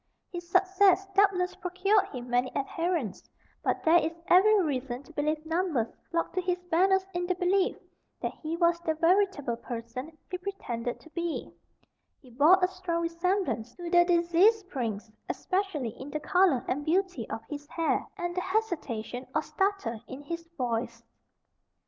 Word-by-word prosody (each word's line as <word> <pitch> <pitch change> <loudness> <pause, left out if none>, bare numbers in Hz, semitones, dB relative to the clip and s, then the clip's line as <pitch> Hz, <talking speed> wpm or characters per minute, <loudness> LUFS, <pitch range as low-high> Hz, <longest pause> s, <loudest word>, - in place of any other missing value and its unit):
His 345 -1 -7
success 380 +1 +4
doubtless 390 -2 +3
procured 375 +3 +1
him 250 -2 -7
many 245 +1 +1
adherents, 315 - -2 0.3
but - - 0
there 335 +1 +6
is 325 +2 -3
every 415 +4 +6
reason 265 -6 -2
to 320 - -16
believe 305 +1 -1
numbers 320 -8 0 0.2
flocked 335 -2 -1
to 370 - 0
his 360 0 0
banners 380 +3 +4
in 355 0 -2
the 365 - +1
belief 370 +2 +1 0.4
that - - -3
he 320 +1 -3
was 340 0 +3
the 320 -2 -1
veritable 335 - +2
person 240 +6 -7
he 365 - -3
pretended 245 -12 -4
to 320 - -16
be; 340 -1 -3 0.7
he 255 -4 -18
bore 295 +10 +6
a - - +6
strong 365 -2 -3
resemblance 335 - -1
to 345 -1 -6
the 350 -1 +7
deceased 350 +5 +3
prince, 225 - -3 0.2
especially 370 - -1
in 265 +6 -9
the 305 - -3
colour 345 -5 +3
and 290 +3 -1
beauty 370 +4 0
of - - -5
his 290 -1 -7
hair, 330 +1 0
and 350 0 -3
the 365 - 0
hesitation 300 - -2
or - - +2
stutter 385 - -1
in 270 +2 -8
his 335 +3 -6
voice. 235 -1 -2
335 Hz, 160 wpm, -29 LUFS, 270-370 Hz, 0.7 s, the